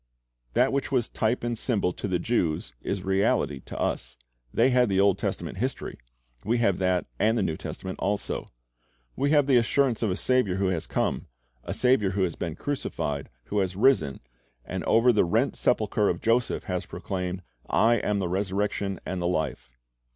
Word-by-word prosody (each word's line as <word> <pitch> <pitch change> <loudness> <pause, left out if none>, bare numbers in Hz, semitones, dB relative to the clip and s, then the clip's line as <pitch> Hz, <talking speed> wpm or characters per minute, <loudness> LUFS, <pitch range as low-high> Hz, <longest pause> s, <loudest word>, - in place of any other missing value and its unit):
That 130 +2 +3
which 140 +1 -1
was 125 -4 +1
type 115 +3 -1
and 120 0 -1
symbol 105 -6 0
to - - -4
the 90 -2 +1
Jews 85 - -1
is 95 -1 -3
reality 95 - +1
to - - -9
us. - - -2 0.3
They 125 +3 +3
had 125 -2 +4
the 95 -1 +2
Old 100 -1 +4
Testament - - -3
histoiy; - - -2 0.5
we 115 +3 +1
have 105 -6 +2
that 90 -2 +1
and 110 +2 +3
the 105 - +1
New 80 -4 -1
Testament 95 +3 -6
also. 100 +1 -2 0.7
We 140 - +1
have 145 -2 +4
the 135 -2 +4
assurance 120 0 +2
of 110 - +1
a 90 - 0
Saviour 125 -4 +1
who 95 -1 +1
has 90 -4 -1
come, - - -1 0.4
a - - -5
Saviour 125 -7 +2
who 95 0 +1
has 85 -3 -1
been 80 -3 -4
crucified, 75 - -3
who 105 +11 -1
has 95 -2 -1
risen, 95 - +3 0.4
and - - -4
over 120 +2 +5
the 105 - +4
rent 110 +10 +1
sepulcher 105 -3 +2
of 85 - -1
Joseph 120 +2 +1
has 90 -1 -3
proclaimed, 90 -1 -4 0.3
"I 115 +1 +4
am 105 -1 0
the 95 -2 -1
resurrection 100 +1 -1
and 90 -1 -3
the 85 - 0
life." 80 -7 -2
100 Hz, 185 wpm, -27 LUFS, 90-120 Hz, 0.7 s, over